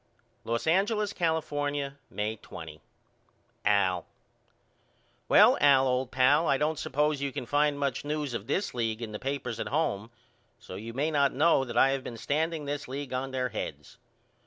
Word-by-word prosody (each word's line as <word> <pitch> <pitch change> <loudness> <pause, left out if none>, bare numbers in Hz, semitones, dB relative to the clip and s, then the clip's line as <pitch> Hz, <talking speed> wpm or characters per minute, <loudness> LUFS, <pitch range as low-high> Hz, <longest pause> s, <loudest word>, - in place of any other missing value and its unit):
Los 115 0 -2
Angeles, 205 +5 +1
California, 145 -4 -1
May 105 +1 -2
20. 80 -6 -10 0.8
AL: 95 -4 +2 1.2
Well - - +7
old 130 -2 +4
pal 140 +6 +4
I 135 - +3
don't 150 +2 0
suppose 150 0 0
you 140 -1 -1
can 125 - -5
find 145 +2 +2
much 140 -3 -1
news 150 -2 -3
of 110 -2 -5
this 195 - -1
league 115 -1 -2
in 110 - -5
the 105 - -6
papers 135 -4 -3
at - - -3
home 115 -9 -1 0.5
so - - -11
you 110 +5 -7
may 150 +4 0
not 140 -2 +2
know 150 -1 +4
that 120 -1 -5
I 135 - +6
have 135 -1 -2
been 120 - -7
standing 155 +4 -1
this 145 0 -4
league 135 +1 -5
on 130 +1 -2
their 130 -1 -1
heads. 75 - -7
135 Hz, 165 wpm, -29 LUFS, 115-150 Hz, 1.2 s, Well